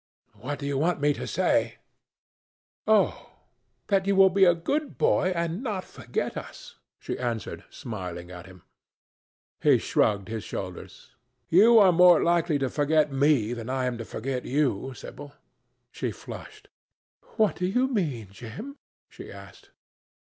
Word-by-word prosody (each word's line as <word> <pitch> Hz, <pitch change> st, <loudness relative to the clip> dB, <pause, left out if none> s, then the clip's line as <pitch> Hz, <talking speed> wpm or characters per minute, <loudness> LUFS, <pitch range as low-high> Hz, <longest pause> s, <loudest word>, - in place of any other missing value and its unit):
"What 145 Hz, +3 st, -5 dB
do 140 Hz, -, -7 dB
you 140 Hz, -1 st, -1 dB
want 170 Hz, +2 st, +1 dB
me 145 Hz, +1 st, +2 dB
to -, -, -6 dB
say?" -, -, +1 dB, 1.1 s
"Oh! 215 Hz, -2 st, +2 dB, 0.6 s
that 195 Hz, -1 st, +2 dB
you 200 Hz, -, +2 dB
will 190 Hz, 0 st, +6 dB
be 195 Hz, +1 st, +5 dB
a 175 Hz, -1 st, +5 dB
good 285 Hz, -, -2 dB
boy 185 Hz, -, +2 dB
and 170 Hz, +4 st, -2 dB
not 210 Hz, -8 st, -3 dB
forget -, -, -4 dB
us," -, -, -10 dB, 0.2 s
she -, -, -5 dB
answered, 115 Hz, -5 st, -4 dB
smiling 90 Hz, -5 st, -7 dB
at 90 Hz, 0 st, -10 dB
him. 90 Hz, -3 st, -15 dB, 1.0 s
He -, -, +5 dB
shrugged 100 Hz, -2 st, +1 dB
his 110 Hz, -1 st, -5 dB
shoulders. 90 Hz, -2 st, -8 dB, 0.4 s
"You 220 Hz, +7 st, +6 dB
are 195 Hz, -4 st, +7 dB
more 180 Hz, -1 st, +6 dB
likely 170 Hz, -2 st, +2 dB
to 135 Hz, -2 st, -1 dB
forget 150 Hz, 0 st, +2 dB
me 135 Hz, -5 st, +2 dB
than 115 Hz, 0 st, -6 dB
I 130 Hz, 0 st, -1 dB
am 125 Hz, -2 st, -2 dB
to -, -, -4 dB
forget 125 Hz, +4 st, -4 dB
you, 135 Hz, -2 st, -1 dB
Sibyl." 145 Hz, +3 st, -10 dB, 0.6 s
She -, -, -3 dB
flushed. -, -, -10 dB, 0.7 s
"What 215 Hz, -2 st, +2 dB
do 180 Hz, -, -1 dB
you 250 Hz, +7 st, +1 dB
mean, 150 Hz, -, -2 dB
Jim?" 120 Hz, -, -9 dB, 0.3 s
she -, -, -11 dB
asked. -, -, -13 dB
145 Hz, 150 wpm, -26 LUFS, 120-185 Hz, 1.1 s, are